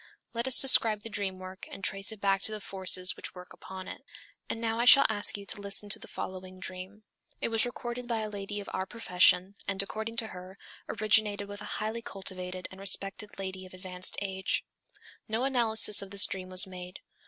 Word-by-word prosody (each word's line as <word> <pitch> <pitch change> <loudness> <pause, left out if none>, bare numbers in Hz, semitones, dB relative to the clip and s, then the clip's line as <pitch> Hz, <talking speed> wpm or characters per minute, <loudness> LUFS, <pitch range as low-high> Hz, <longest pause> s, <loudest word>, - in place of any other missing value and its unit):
Let 235 +2 -2
us 260 - +8
describe 225 -5 +6
the 225 - -6
dream 200 -2 -3
work 185 0 -9
and 195 - -10
trace 195 +3 0
it 220 - -10
back 195 -1 +1
to 220 - +1
the 215 - -4
forces 185 -2 +1
which - - -5
work 180 0 -11
upon 190 0 -9
it. - - -8 0.5
And - - -3
now 225 0 -1
I 240 - +2
shall 275 +2 +8
ask 205 -1 +2
you 200 - -9
to 200 - 0
listen 200 +1 -1
to - - 0
the - - -11
following 185 0 -7
dream. 185 +3 -8 0.4
It - - -1
was 225 +2 +2
recorded 240 0 -6
by 230 -2 -1
a 215 - -3
lady 205 0 -5
of 200 - -8
our 190 0 -2
profession, 185 -3 +2
and 200 0 0
according 220 +3 -5
to 230 -1 -1
her, 185 +1 -10 0.3
originated 210 -1 +2
with 205 0 -8
a - - -7
highly 220 +2 -3
cultivated 185 -3 -4
and 190 - -12
respected 195 +1 -2
lady 190 -1 -5
of 185 - -13
advanced 185 0 -2
age. 190 -1 -2 0.6
No 225 +2 -1
analysis 230 -5 +5
of 195 - -8
this 200 +1 +6
dream 185 -1 -5
was 185 0 +6
made. 180 -1 -10
200 Hz, 210 wpm, -29 LUFS, 185-220 Hz, 0.6 s, us